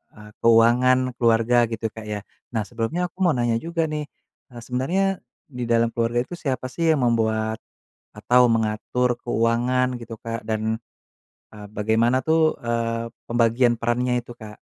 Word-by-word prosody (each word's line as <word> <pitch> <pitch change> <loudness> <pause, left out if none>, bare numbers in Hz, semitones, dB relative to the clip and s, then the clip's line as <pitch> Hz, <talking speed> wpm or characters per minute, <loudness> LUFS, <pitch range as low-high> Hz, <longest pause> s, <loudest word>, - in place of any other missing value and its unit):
eee, 105 0 -13
keuangan 125 +3 +4
keluarga 115 +1 +3
gitu, 115 0 -2
Kak, 110 - -9
ya. 105 -1 -3 0.4
Nah, 110 - +1
sebelumnya 120 +9 -3
aku - - -56
mau 165 -6 +3
nanya 120 -1 +1
juga 165 +2 -2
nih, 150 -1 -3 0.4
eee, 120 -1 -10
sebenarnya 135 +11 -1 0.4
di 125 -3 -6
dalam 115 0 +2
keluarga 120 +1 0
itu 175 - -8
siapa 130 -3 -2
sih 165 +4 -1
yang 140 -5 +1
membuat 110 -2 0 0.6
atau 125 0 +4
mengatur 115 +3 0
keuangan 120 +2 +1
gitu, 115 -2 -9
Kak? 115 0 -5
Dan, 110 0 -1 0.7
eee, 105 -1 -11
bagaimana 115 +4 +2
tuh, 160 0 +3
eee, 115 0 -2 0.2
pembagian 120 +1 +2
perannya 120 +1 0
itu, 120 - -16
Kak? 105 -1 -10
120 Hz, 150 wpm, -23 LUFS, 115-125 Hz, 0.7 s, keuangan